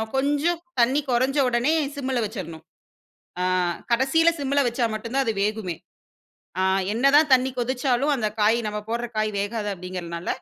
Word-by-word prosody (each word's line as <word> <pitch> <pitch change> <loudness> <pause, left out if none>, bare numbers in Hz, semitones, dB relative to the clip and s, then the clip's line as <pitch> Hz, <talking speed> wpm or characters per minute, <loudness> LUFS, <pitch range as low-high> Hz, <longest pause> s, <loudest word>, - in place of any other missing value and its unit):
கொஞ்சம் 290 +5 +1 0.2
தண்ணீ 255 +5 +4
கொறைஞ்ச 260 +4 +1
உடனே 250 +5 +2 0.2
சிம்ல 265 -3 -2
வச்சிரனும். 180 -7 -7 0.8
அ - - +1 0.5
கடைசியில 270 +8 +4
சிம்ல 280 0 0
வச்சா 240 0 0
மட்டும் 230 +2 -6
தான் 275 - +2
அது 225 - 0
வேகுமே. 210 -5 -2 0.9
அ - - +2 0.3
என்ன 240 +5 +1
தான் 300 -1 +4
தண்ணீ 260 0 +4
கொதிச்சாலும், 260 +3 0
அந்த 215 -4 0
காய் 220 +3 +4
நம்ம 210 0 -3
போடுற 235 +1 -2
காய் 215 0 +1
வேகாது 210 0 -3
அப்டிங்கிறதுனால 175 -2 -6
240 Hz, 150 wpm, -24 LUFS, 215-270 Hz, 0.9 s, தண்ணீ